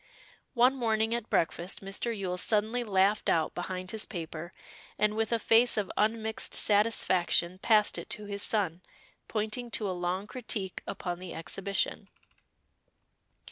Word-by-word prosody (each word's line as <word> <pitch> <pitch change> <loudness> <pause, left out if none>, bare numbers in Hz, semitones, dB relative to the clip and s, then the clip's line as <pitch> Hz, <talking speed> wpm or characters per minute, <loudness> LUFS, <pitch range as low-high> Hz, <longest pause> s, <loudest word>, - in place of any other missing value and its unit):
One 250 +2 +5
morning 225 -2 +1
at 235 -2 -3
breakfast 170 +2 0
Mr. 215 +4 -1
Yule 185 -2 -2
suddenly 220 +4 +1
laughed 200 -1 +2
out 160 -2 +1
behind 185 +1 -4
his 220 -1 -2
paper, 170 -2 -6 0.5
and 210 0 +2
with 225 0 -1
a 230 - +3
face 230 +2 +4
of 205 -3 -1
unmixed 220 +1 0
satisfaction 185 -4 +2
passed 210 0 +3
it - - -9
to 210 - -4
his 200 0 -4
son, 185 -6 +1 0.5
pointing 220 +3 -2
to 215 -2 -1
a - - -1
long 180 +2 -2
critique 210 -5 -3
upon 175 -3 -4
the 185 -2 -7
Exhibition. 195 +4 -2
205 Hz, 140 wpm, -30 LUFS, 185-220 Hz, 0.5 s, One